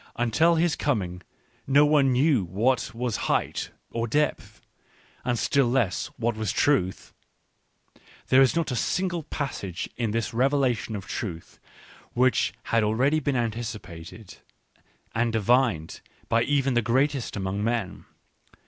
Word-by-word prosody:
Until 155 +9 +3
his 165 -2 +2
coming 95 -12 -2 0.5
no 140 +2 +5
one 145 -3 +4
knew 130 -3 +3
what 110 +10 0
was 120 -1 -2
height, - - 0 0.2
or 115 0 -2
depth, 150 +6 -1 0.6
and 120 -1 0
still 135 +4 +2
less 120 -7 0
what 120 -1 -1
was 110 -3 -2
truth. 105 -7 0 1.2
There 130 +1 +6
is 135 +2 +4
not 165 -4 0
a - - -1
single 175 - -1
passage 120 - -4
in 115 -3 -1
this 115 +2 -2
revelation 130 -3 +1
of 100 -3 -6
truth 85 -6 -6 0.5
which 130 +1 +2
had 115 - +1
already 130 +9 +2
been 145 -3 -1
anticipated 110 -5 -5 0.8
ancT 115 0 +1
divined 115 -6 +1 0.3
by 115 - +2
even 140 -2 +1
the 120 - +3
greatest 130 +2 0
among 95 +1 -2
men. 110 -4 -2
120 Hz, 130 wpm, -26 LUFS, 105-135 Hz, 1.2 s, There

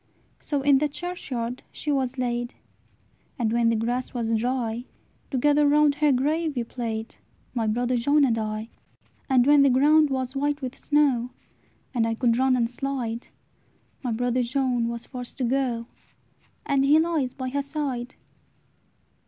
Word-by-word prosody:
"So 285 -3 -1
in 280 -1 +5
the 300 +1 +1
churchyard 260 -8 -5
she 300 - -4
was 265 -2 -1
laid; 240 -1 -2 0.8
And, 230 -3 0
when 235 -1 +3
the 230 - +2
grass 245 +4 -2
was 230 -2 -1
dry, 240 0 -1 0.4
Together 290 +2 +3
round 295 0 +4
her 295 0 +2
grave 300 +4 0
we 240 - 0
played, 230 -2 -5 0.4
My 230 -3 -1
brother 245 +3 0
John 285 +5 +3
and 235 -4 +2
I. 215 0 -3 0.6
"And 255 -2 +4
when 290 0 +6
the 275 - +5
ground 295 +4 +5
was 260 0 -2
white 290 +1 0
with 260 -1 -5
snow, 275 -6 +1 0.6
And 230 -3 +1
I 225 - -1
could 235 -1 +2
run 260 0 +3
and 235 -2 +1
slide, 245 -2 -4 0.7
My 250 - -2
brother 245 +2 0
John 245 -1 0
was 235 0 -4
forced 250 -2 -7
to 260 - -2
go, 245 -2 0 0.8
And 275 -1 +2
he 285 +3 +5
lies 315 -6 0
by 260 -1 -4
her 280 +2 -1
side." 275 -4 -4
255 Hz, 160 wpm, -25 LUFS, 235-280 Hz, 0.8 s, when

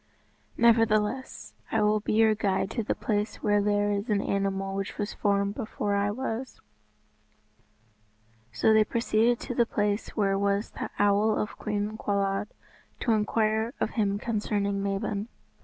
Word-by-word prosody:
Nevertheless, 225 +1 +2 0.2
I 220 -1 +2
will 210 +1 +3
be 210 - -2
your 220 0 +5
guide 195 -2 -1
to 235 - -1
the 215 - -1
place 210 -1 -2
where 205 0 +3
there 205 0 +1
is 205 +3 -2
an 205 -2 +2
animal 195 -1 -1
which 195 0 -4
was 205 -1 -3
formed 200 -1 +1
before 210 -3 -3
I 200 0 +1
was." 250 +2 -4 1.9
So 120 - +3
they 220 0 +6
proceeded 230 +1 +1
to 250 - -4
the 235 -1 +2
place 205 -1 -1
where 195 -2 +2
was 200 +1 0
the - - -5
Owl 205 +1 +3
of 210 - -3
Cwm 210 0 -2
Cawlwyd, 200 0 0 0.5
to 240 - +1
inquire 220 +1 +1
of - - -1
him 205 -3 0
concerning 205 -2 -1
Mabon. 200 +1 -2
210 Hz, 150 wpm, -27 LUFS, 200-220 Hz, 1.9 s, they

